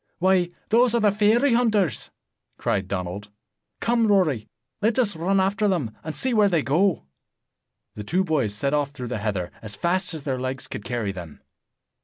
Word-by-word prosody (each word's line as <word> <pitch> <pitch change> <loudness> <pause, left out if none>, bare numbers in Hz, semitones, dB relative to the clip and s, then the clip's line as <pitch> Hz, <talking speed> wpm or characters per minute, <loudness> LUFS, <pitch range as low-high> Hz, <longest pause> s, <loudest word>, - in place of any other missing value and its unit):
"Why, 185 -1 +3 0.2
those 235 +1 +4
are - - +3
the 210 -2 +4
fairy 220 +6 +3
hunters!" 210 - +1 0.5
cried 95 -1 -1
Donald. 95 +2 -4 0.5
"Come, 230 -1 +2
Rory, 165 - +2 0.3
let 220 +2 +2
us 215 -7 +1
run 185 +4 +1
after 200 +2 +1
them, 150 - -1
and 155 0 -5
see 260 -1 0
where 210 -2 +4
they 165 -5 +1
go." 170 - +1 0.9
The 105 - -7
two 180 - +1
boys 150 - 0
set 140 +6 -1
off 145 -1 +1
through 125 -4 -6
the 120 -3 -3
heather, 100 -5 -2
as 105 -2 -7
fast 175 - -1
as 155 - -7
their 130 -3 -2
legs 130 0 -4
could 105 - -7
carry 115 -4 -2
them. 85 -5 -9
165 Hz, 180 wpm, -24 LUFS, -, 0.9 s, those